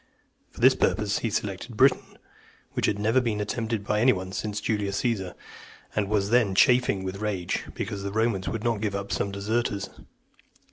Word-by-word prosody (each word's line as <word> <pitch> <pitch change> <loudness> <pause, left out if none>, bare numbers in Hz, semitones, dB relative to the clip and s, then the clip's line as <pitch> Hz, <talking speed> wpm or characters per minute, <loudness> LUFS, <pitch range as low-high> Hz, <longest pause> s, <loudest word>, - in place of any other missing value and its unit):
For - - -12
this - - +7
purpose, 105 -1 +1
he 115 - -1
selected 105 +3 -4
Britain, 130 +2 +3 0.6
which - - 0
had 100 - 0
never 110 +5 +2
been 115 -4 -1
attempted 110 +1 -2
by 105 0 +1
any 130 +2 +6
one 95 -4 -4
since 105 +1 -3
Julius 100 -3 -1
Caesar, 100 -7 -1 0.6
and 100 -2 0
was 105 -1 +1
then 115 -6 +3
chafing 125 -3 +4
(309) - - -6
with 95 +2 -5
rage, 100 -5 -2
because 100 -1 -4
the 100 0 -4
Romans 110 -3 0
would 115 -2 -4
not 115 -3 0
give 105 -2 -1
up 100 0 -4
some 100 - -1
deserters. 100 0 -2
105 Hz, 185 wpm, -26 LUFS, 100-115 Hz, 0.6 s, this